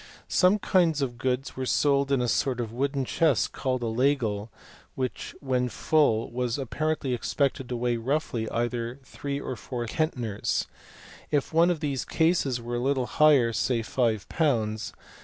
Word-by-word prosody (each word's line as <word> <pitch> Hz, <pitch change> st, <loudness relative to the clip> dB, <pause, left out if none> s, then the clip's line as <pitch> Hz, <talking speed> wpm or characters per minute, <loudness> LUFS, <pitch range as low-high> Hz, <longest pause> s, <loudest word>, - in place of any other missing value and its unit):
Some 185 Hz, +3 st, +5 dB
kinds 170 Hz, -7 st, +2 dB
of 120 Hz, -3 st, -4 dB
goods 130 Hz, +1 st, -1 dB
were 130 Hz, 0 st, -3 dB
sold 140 Hz, 0 st, +2 dB
in 135 Hz, -2 st, +3 dB
a -, -, 0 dB
sort 130 Hz, 0 st, 0 dB
of 115 Hz, -2 st, -3 dB
wooden 135 Hz, +2 st, -1 dB
chest 155 Hz, -2 st, +2 dB
called 130 Hz, -2 st, -2 dB
a -, -, 0 dB
layel, 115 Hz, -3 st, 0 dB, 0.5 s
which 130 Hz, -1 st, -4 dB
when 125 Hz, -2 st, 0 dB
full 115 Hz, -2 st, +2 dB
was 125 Hz, 0 st, -1 dB
apparently 145 Hz, 0 st, -1 dB
expected 135 Hz, +1 st, -1 dB
to 125 Hz, -, -2 dB
weigh 120 Hz, 0 st, 0 dB
roughly 120 Hz, -2 st, -1 dB
either 120 Hz, +1 st, -2 dB
three 140 Hz, +2 st, -5 dB
or 130 Hz, -, -4 dB
four 120 Hz, +1 st, -5 dB
centners; 120 Hz, -6 st, -1 dB, 0.6 s
if 145 Hz, 0 st, 0 dB
one 165 Hz, +2 st, +5 dB
of 170 Hz, -4 st, -1 dB
these 140 Hz, -4 st, -1 dB
cases 160 Hz, -7 st, +1 dB
were 120 Hz, +1 st, -4 dB
a -, -, -1 dB
little 130 Hz, 0 st, 0 dB
lighter, 140 Hz, -7 st, +6 dB
say 115 Hz, 0 st, 0 dB
5 110 Hz, -4 st, 0 dB
Ibs. 110 Hz, -9 st, 0 dB
130 Hz, 160 wpm, -27 LUFS, 120-145 Hz, 0.6 s, lighter